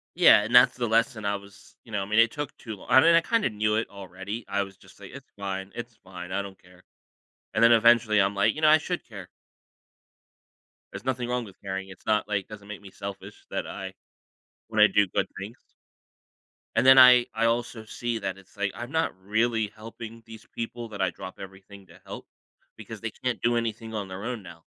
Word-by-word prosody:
Yeah, - - +7
and 110 +4 -5
that's 125 +1 +7
the 120 -2 -2
lesson 115 0 +1
I 100 0 0
was 100 0 -17
you 115 - -15
know, 105 - -1
I - - -5
mean, 110 +2 +2
it 115 0 +5
took 145 -2 -5
too 110 -3 -7
long 95 - -15
I 130 - +7
mean, 165 +3 +6
I 170 - +6
kinda 225 - +1
knew 105 0 0
it 110 - -1
already, 100 +3 -8
I 100 0 0
was 95 0 -11
just - - -20
like, - - -11
"It's - - -12
fine, 95 -1 -5
it's 120 -1 -8
fine, 90 -1 -10
I 100 - 0
don't 95 -1 -10
care," 90 0 -20 0.7
and 110 - +1
then 115 - +7
eventually 115 -2 +5
I'm 100 +1 +1
like, 100 - +3
"You 155 - -6
know, 155 - +5
I 155 +1 +7
should 175 +3 -4
care." 100 -6 -10 1.6
There's - - -9
nothing 125 -2 -2
wrong 125 -1 -1
with 95 - -15
caring, 95 -1 -5
it's 95 - -14
not, 105 -1 +1
like 100 -2 0
it - - -44
doesn't 105 -1 -11
make 105 -1 -8
me 100 -2 -13
selfish 100 0 -9
that - - -3
I - - -7 0.8
when 110 -1 -1
I 105 - +8
do 100 +1 +3
good 90 - -1
things 105 +6 -10 1.0
and - - +2
then 130 0 +8
I 125 -1 +9
I 115 +1 0
also 115 -1 -1
see 115 +1 -3
that 95 - -4
it's, 95 0 -19
like, 100 -1 -1
I'm 120 +3 -7
not 160 0 0
really 110 +2 0
helping 115 +1 -10
these 115 -1 -12
people 115 0 -5
that 100 -2 -6
I 95 - +2
drop 95 +2 -10
everything 95 0 -12
to - - -17
help, - - -9 0.5
because 110 -3 -9
they 115 - -4
can't 125 -6 -3
do 120 0 +2
anything 115 -1 -4
on 105 -3 -4
their 95 +1 -8
own 120 -3 -4
now. 85 -2 -13
110 Hz, 225 wpm, -26 LUFS, 100-120 Hz, 1.6 s, I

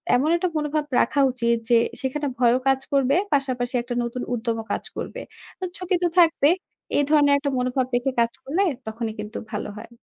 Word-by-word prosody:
এমন 270 +5 +2
একটা 355 +1 0
মনোভাব 300 0 -1
রাখা 285 - +1
উচিত 235 -2 +1
যে, 240 - +6 0.3
সেখানে 285 +2 -2
ভয়ও 245 0 +4
কাজ 270 0 +4
করবে, 275 0 +3 0.2
পাশাপাশি 255 -3 0
একটা 240 +1 -5
নতুন 235 +1 -4
উদ্যমও 225 -1 -2
কাজ - - -2
করবে। - - -5 0.4
তো - - -7
ঝুকি 365 0 -1
তো - - +4
থাকবে। 325 -4 +5 0.5
এই 290 - +4
ধরনের 290 -2 +5
একটা 280 0 -2
মনোভাব 250 +1 0
রেখে 245 +2 +1
কাজ 235 0 +3
করলে 320 +8 0 0.3
তখনই 220 0 -3
কিন্তু 210 +1 -6
ভালো 210 0 -3
হয়। - - -9
260 Hz, 185 wpm, -24 LUFS, 235-290 Hz, 0.5 s, যে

